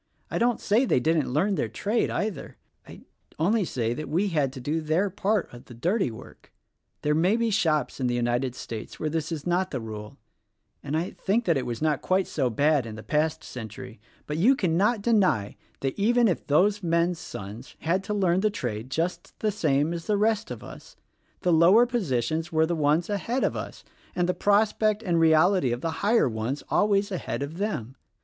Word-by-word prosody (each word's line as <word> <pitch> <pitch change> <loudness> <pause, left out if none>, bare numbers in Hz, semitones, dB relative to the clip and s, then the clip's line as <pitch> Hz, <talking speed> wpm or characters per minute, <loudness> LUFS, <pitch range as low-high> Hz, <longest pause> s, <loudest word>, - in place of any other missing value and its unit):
I - - -1
don't 240 0 +2
say 215 +5 +2
they 240 - +2
didn't 155 0 +1
learn 185 +10 +1
their - - -1
trade, 215 +3 0
either. 210 -4 -4 0.3
I - - -12 0.4
only 200 +7 +2
say 120 -8 -1
we 165 +8 -1
had 150 -6 0
to 135 - -8
do 150 +6 -2
their 165 +6 0
part 205 - -1
of 120 - -12
the 120 - -12
dirty 180 - 0
work. 110 - -13 0.5
There 150 - +2
may 175 +7 +3
be 230 -1 0
shops 160 -10 +1
in 130 - 0
the 120 - 0
United 120 +1 0
States 115 -3 -7
where 155 - -2
this 160 +1 -2
is 155 -3 -4
not 180 +1 +1
the 130 - -3
rule; 110 +2 -8 0.6
and 145 +2 -2
I 170 +3 -2
think 225 +5 -1
that 170 - +3
it 135 - -2
was 120 +4 -4
not 150 -3 +1
quite 185 0 +1
so 135 -5 -1
bad 140 +1 +2
in 110 - -7
the 110 - -9
past 155 +1 0
century; 120 0 -9 0.3
but 150 +1 -3
you 250 +10 +5
cannot 200 +2 +1
deny 190 - +2 0.3
that 135 +4 -2
even 235 +3 +4
if 180 - -2
those 200 +8 +3
men's 170 0 +1
sons 105 +6 -9
had 180 +4 0
to 210 - -2
learn 185 -3 +2
the 215 +2 +2
trade 120 - -4
just 165 +6 -3
the 215 - +1
same 155 -5 +1
as 170 -1 -6
the 210 -1 +2
rest 220 +1 +1
of - - -7
us - - -12 0.5
the 180 - +2
lower 180 +9 +6
positions 160 - -1
were 160 0 +3
the 170 +1 -1
ones 155 +2 +2
ahead 225 +5 -1
of - - 0
us - - -7 0.3
and 175 -1 +1
the 180 - +1
prospect 210 +3 +2
and 175 -5 +1
reality 160 -2 +4
of 120 +1 -3
the 165 - -1
higher 220 - +3
ones 115 +4 -3
always 205 -1 +2
ahead 175 -6 -3
of 155 +5 -7
them. 130 - -3
165 Hz, 200 wpm, -26 LUFS, 135-200 Hz, 0.6 s, lower